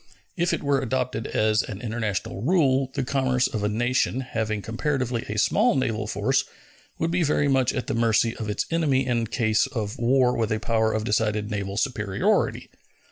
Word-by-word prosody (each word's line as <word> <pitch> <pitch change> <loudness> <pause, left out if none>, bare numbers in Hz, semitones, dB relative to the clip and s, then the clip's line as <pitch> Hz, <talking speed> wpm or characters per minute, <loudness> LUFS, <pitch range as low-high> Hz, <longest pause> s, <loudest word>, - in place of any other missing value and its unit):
If 175 -1 +1
it - - -2
were 140 -2 +2
adopted 125 -2 -2
as 110 0 +2
an 100 - -7
international 110 -4 -3
rule, 135 - +2
the - - 0
commerce 130 -1 +1
of 110 -6 -2
a 105 - +1
nation 120 +3 0
having 110 -4 -3
comparatively 125 0 -2
a 105 - -3
small 215 - +3
naval 110 -5 -1
force - - +1 0.5
would 165 +1 -1
be 175 +1 +1
very 145 -2 +2
much 135 -2 +2
at 130 - -3
the - - -2
mercy 115 0 +2
of 110 -2 -4
its 105 - -1
enemy 145 -6 +2
in 120 -2 0
case 110 +1 +1
of 110 -6 -4
war 125 +1 +3
with 110 -1 -1
a 110 - 0
power 110 -1 +1
of 110 0 -1
decided 105 -1 0
naval 100 -1 -3
superiority. 105 -6 0
120 Hz, 185 wpm, -25 LUFS, 110-130 Hz, 0.5 s, small